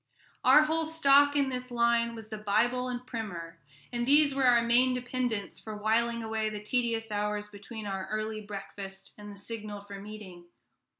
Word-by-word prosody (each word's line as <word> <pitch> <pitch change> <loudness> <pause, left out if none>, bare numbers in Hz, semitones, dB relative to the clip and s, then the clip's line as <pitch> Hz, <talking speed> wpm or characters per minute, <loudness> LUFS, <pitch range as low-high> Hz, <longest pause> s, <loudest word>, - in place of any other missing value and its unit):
Our 300 - +7
whole 320 +1 0
stock 285 -2 +5
in 280 -2 +2
this 250 -1 -5
line 235 -1 +2
was 220 -1 -10
the 215 - -5
Bible 235 +5 +1
and 250 0 -5
Primer, 175 -9 -6 0.3
and 240 0 -1
these 290 0 +5
were 270 -1 +2
our 240 -1 +5
main 245 +2 +4
dependence 245 -4 -3
for 215 -1 -7
whiling 230 +2 +1
away 220 -1 -1
the 210 -1 -5
tedious 230 -1 -1
hours 210 0 -1
between 210 +2 -9
our 195 -1 -4
early 215 +1 -3
breakfast 195 -1 -8
and 205 0 -9
the 200 - -11
signal 210 -1 -7
for 200 -1 -9
meeting. 200 -4 -10
225 Hz, 175 wpm, -29 LUFS, 205-250 Hz, 0.3 s, Our